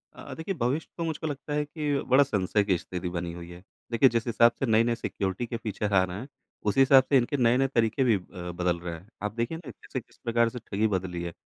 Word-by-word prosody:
अ -, -, -11 dB
अ, -, -, -8 dB
देखिए 175 Hz, +4 st, -4 dB
भविष्य 135 Hz, +7 st, 0 dB
तो 170 Hz, -, -2 dB
मुझको 160 Hz, -1 st, -3 dB
लगता 145 Hz, 0 st, -5 dB
है 150 Hz, 0 st, 0 dB
कि 150 Hz, -1 st, -2 dB, 0.2 s
बड़ा 140 Hz, +2 st, +8 dB
संशय 105 Hz, -4 st, +1 dB
की 95 Hz, -3 st, +2 dB
स्थिति 90 Hz, 0 st, -5 dB
बनी 85 Hz, -1 st, -3 dB
हुई 85 Hz, 0 st, -9 dB
है। 90 Hz, +1 st, -11 dB, 0.3 s
देखिए 125 Hz, +3 st, +5 dB
जिस 115 Hz, -1 st, -1 dB
हिसाब 115 Hz, 0 st, +5 dB
से -, -, +1 dB
नए-नए 115 Hz, 0 st, +3 dB
सिक्योरिटी 100 Hz, -1 st, -3 dB
के 115 Hz, -, -3 dB
फ़ीचर 105 Hz, -2 st, -3 dB
आ 95 Hz, -1 st, +5 dB
रहे 90 Hz, 0 st, -4 dB
हैं 125 Hz, +6 st, -7 dB, 0.4 s
उसी 105 Hz, -, +1 dB
हिसाब 135 Hz, 0 st, +7 dB
से 140 Hz, -, +6 dB
इनके 130 Hz, +3 st, +1 dB
नए-नए 125 Hz, +2 st, +3 dB
तरीके 115 Hz, 0 st, +1 dB
भी 120 Hz, -4 st, +4 dB
अ, 90 Hz, -1 st, -8 dB
बदल 90 Hz, 0 st, -1 dB
रहे 85 Hz, 0 st, -5 dB
हैं। 85 Hz, +4 st, -13 dB, 0.2 s
आप 105 Hz, -, -2 dB
देखिए 120 Hz, +7 st, -2 dB
ना 160 Hz, -5 st, -10 dB
कैसे -, -, -6 dB
किस -, -, -20 dB
प्रकार 115 Hz, 0 st, +2 dB
से 125 Hz, -, -4 dB
ठगी 105 Hz, +2 st, +2 dB
बदली 90 Hz, -2 st, -3 dB
है। 85 Hz, -, -4 dB
115 Hz, 250 wpm, -27 LUFS, 95-135 Hz, 0.4 s, बड़ा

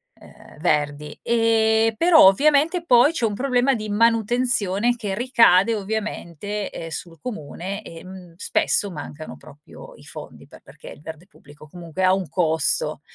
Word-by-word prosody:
ehm, -, -, -18 dB
verdi. 150 Hz, -2 st, -2 dB
Eh, 225 Hz, -1 st, +2 dB
però 330 Hz, -, +6 dB
ovviamente 300 Hz, -, +2 dB
poi 250 Hz, 0 st, +5 dB
c'è 285 Hz, -8 st, -1 dB
un 210 Hz, -2 st, -2 dB
problema 255 Hz, +2 st, +1 dB
di 215 Hz, -2 st, -6 dB
manutenzione 230 Hz, 0 st, +1 dB
che 210 Hz, -5 st, -5 dB
ricade 230 Hz, -3 st, +3 dB
ovviamente, 205 Hz, -2 st, -5 dB
eh, 165 Hz, -, -8 dB
sul 165 Hz, 0 st, -5 dB
comune, 200 Hz, -, -7 dB
ehm, 180 Hz, 0 st, -12 dB
spesso 200 Hz, +1 st, 0 dB
mancano 155 Hz, -1 st, -9 dB
proprio 150 Hz, +1 st, -15 dB
i -, -, -18 dB
fondi, -, -, -11 dB
pe -, -, -17 dB
perché -, -, -16 dB
il -, -, -13 dB
verde 160 Hz, +3 st, -11 dB
pubblico 150 Hz, -6 st, -18 dB
comunque 175 Hz, +2 st, -7 dB
ha 185 Hz, 0 st, +4 dB
un 190 Hz, -2 st, -2 dB
costo, 160 Hz, -4 st, 0 dB
205 Hz, 145 wpm, -22 LUFS, 170-235 Hz, -, però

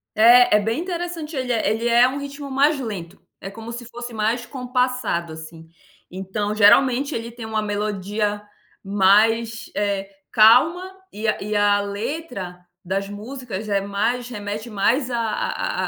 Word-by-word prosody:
É, 235 Hz, 0 st, +7 dB
é -, -, +2 dB
bem 225 Hz, +8 st, -1 dB
interessante, 345 Hz, -3 st, -5 dB
ele 255 Hz, -1 st, -1 dB
é 225 Hz, -, +1 dB
ele 225 Hz, +2 st, -1 dB
é 240 Hz, +1 st, +5 dB
um 275 Hz, +2 st, -4 dB
ritmo 280 Hz, 0 st, -7 dB
mais 285 Hz, +2 st, +3 dB
lento. 195 Hz, -8 st, -6 dB, 0.2 s
É 195 Hz, -, -7 dB
como 225 Hz, +3 st, -9 dB
se 240 Hz, +1 st, -7 dB
fosse 240 Hz, +1 st, -8 dB
mais 225 Hz, +2 st, -1 dB
compassado, 250 Hz, -, -2 dB
assim. 160 Hz, +1 st, -11 dB, 0.4 s
Então, 190 Hz, +3 st, -3 dB
geralmente, 245 Hz, +6 st, +4 dB
ele 230 Hz, +1 st, -5 dB
tem 235 Hz, -1 st, -9 dB
uma 220 Hz, -1 st, -1 dB
melodia 205 Hz, 0 st, -2 dB, 0.4 s
mais, 215 Hz, +4 st, +2 dB
eh, 200 Hz, -1 st, -1 dB, 0.2 s
calma 310 Hz, +13 st, +5 dB, 0.2 s
e 215 Hz, +2 st, -4 dB
a 215 Hz, -, +1 dB
e 210 Hz, +1 st, -3 dB
a 205 Hz, 0 st, +3 dB
letra 200 Hz, -, -5 dB, 0.2 s
das 195 Hz, +2 st, -2 dB
músicas 215 Hz, 0 st, -7 dB
é 200 Hz, -1 st, +2 dB
mais 215 Hz, +5 st, -1 dB
remete 210 Hz, -1 st, -6 dB
mais 235 Hz, +6 st, +1 dB
a 240 Hz, -, -2 dB
a 225 Hz, -2 st, -2 dB
220 Hz, 155 wpm, -22 LUFS, 205-250 Hz, 0.4 s, É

